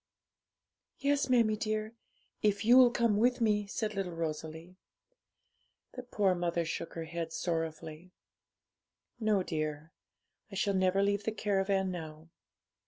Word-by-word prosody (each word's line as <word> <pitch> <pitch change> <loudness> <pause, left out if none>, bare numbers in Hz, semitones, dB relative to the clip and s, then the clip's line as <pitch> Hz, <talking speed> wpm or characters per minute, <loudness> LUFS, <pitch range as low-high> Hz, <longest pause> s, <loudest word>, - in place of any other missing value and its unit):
'Yes, 280 -1 +1
mammie 230 -4 +4
dear, 215 -1 -2 0.5
if 205 0 +1
you'll 250 +1 +8
come 235 -3 +1
with 245 +3 +2
me,' 210 -3 +1
said 215 +1 -3
little 190 -4 -3
Rosalie. 160 +2 -5 1.2
The 250 - -7
poor 210 -6 +1
mother 175 -1 -1
shook 165 0 -5
her 165 - -4
head 165 0 -5
sorrowfully. 160 0 -4 1.1
'No, 215 -4 +2
dear; 155 -1 -4 0.6
I - - -7
shall 200 +1 +1
never 190 +1 +2
leave 200 0 0
the 220 - 0
caravan 195 -3 0
now. 160 -2 -8
195 Hz, 125 wpm, -31 LUFS, 165-215 Hz, 1.2 s, you'll